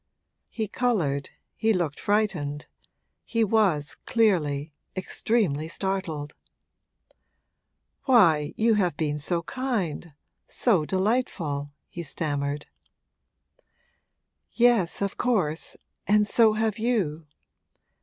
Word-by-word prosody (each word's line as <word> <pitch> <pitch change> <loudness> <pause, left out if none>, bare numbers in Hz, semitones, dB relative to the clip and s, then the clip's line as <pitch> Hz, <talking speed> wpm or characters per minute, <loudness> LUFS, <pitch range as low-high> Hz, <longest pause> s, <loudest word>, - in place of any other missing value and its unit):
He 220 -2 -3
coloured, 170 - 0 0.3
he 220 0 +2
looked 170 -6 -1
frightened, 175 -9 0 0.6
he 230 -1 0
was, 195 -9 +2
clearly, 155 - +1 0.2
extremely 185 -6 0
startled. 165 -5 -3 1.7
'Why, 165 - +4
you 225 +1 +3
have 180 -7 +1
been 150 -2 -1
so 170 +3 +1
kind, 190 - -3 0.3
so 195 -11 +2
delightful,' 185 - -1 0.2
he 175 - -7
stammered. 145 -2 -3 1.9
'Yes, 230 -7 +3
of 200 - -3
course, 180 -11 0 0.3
and 210 +1 +4
so 220 0 +4
have 220 -1 -1
you! 185 -10 -1
185 Hz, 90 wpm, -26 LUFS, 150-220 Hz, 1.9 s, Why